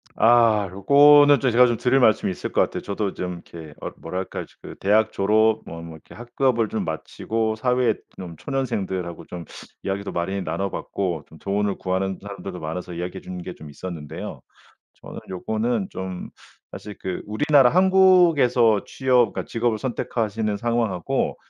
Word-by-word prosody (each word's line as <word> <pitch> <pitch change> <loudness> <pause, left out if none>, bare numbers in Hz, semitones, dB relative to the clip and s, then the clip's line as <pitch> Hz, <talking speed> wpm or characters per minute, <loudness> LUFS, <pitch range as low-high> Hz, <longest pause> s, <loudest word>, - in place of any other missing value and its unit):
아 115 -3 +4
요거는 145 +8 +6
좀 130 -3 +1
제가 125 +2 +6
좀 120 -1 0
드릴 130 +3 +2
말씀이 110 -5 +3
있을 - - -5
것 - - +2
같아요. - - -1
저도 100 -1 -3
좀 90 0 -4 0.2
이렇게 80 -3 -9
어 - - -5
뭐랄까? 95 0 -5
지금 - - -13
대학 110 +2 +3
졸업 110 +2 +2
뭐 85 0 -8
뭐 85 -1 -9
이렇게 80 - -16
학급을 120 -1 0
좀 110 - -2
마치고 110 +7 -2
사회 125 0 +2 0.2
좀 90 -3 -8
초년생들하고 95 - -3
좀 85 -2 -8 0.4
이야기도 100 +1 -3
많이 95 +3 -2
나눠 100 0 -2
봤고 90 -5 -3
좀 80 - -15
조언을 100 0 -1
구하는 95 0 -2
사람들도 100 -2 -7
많아서 85 +3 -5
이야기해 90 +2 -5
주는 90 -1 -7
게 90 - -6
좀 75 -3 -12
있었는데요. 80 -1 -7 0.5
저는 - - -11
요거는 110 +3 -1
좀 95 -1 -6 0.4
사실 105 -1 -9
그 95 -1 -4
우리나라 135 +4 +4
한국에서 175 - +4
취업 125 -5 +2
그러니까 - - -4
직업을 115 -1 -1
선택하시는 110 -3 -2
상황 120 -2 0
하고 90 -2 -2
105 Hz, 360 characters per minute, -23 LUFS, 95-120 Hz, 0.5 s, 요거는